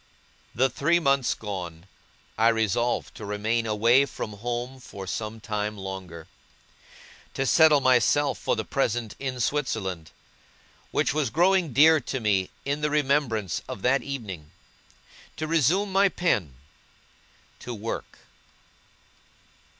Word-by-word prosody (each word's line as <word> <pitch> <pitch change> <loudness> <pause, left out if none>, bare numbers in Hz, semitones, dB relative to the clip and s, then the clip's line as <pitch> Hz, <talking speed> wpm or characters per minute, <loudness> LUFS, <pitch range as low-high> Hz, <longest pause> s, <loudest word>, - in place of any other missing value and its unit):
The 130 +4 +3
three 150 +7 +1
months 140 -5 +2
gone, 90 -5 -6 0.5
I 110 +2 +3
resolved 115 +1 0
to - - -10
remain 110 +3 -1
away 115 +6 +4
from 105 - -6
home 120 +4 -4
for 100 -6 -9
some 110 +4 -4
time 105 -1 -3
longer; 95 -4 -7 1.1
to 135 - 0
settle 150 +3 +5
myself 130 +3 +3
for - - 0
the - - -3
present 120 -5 -1
in 130 -2 -4
Switzerland, 105 - -2 0.8
which - - 0
was 150 -5 0
growing 175 +2 +2
dear 155 +5 +6
to 135 - -4
me 100 -5 +1 0.2
in 140 +2 -1
the 150 - +1
remembrance 140 - 0
of 100 - -7
that 135 +2 +3
evening; 100 - -6 0.9
to 155 - -2
resume 165 +6 +2
my 195 +1 +4
pen; 110 - 0 1.0
to 125 - -7
work. 115 0 -6
120 Hz, 125 wpm, -26 LUFS, 105-140 Hz, 1.1 s, dear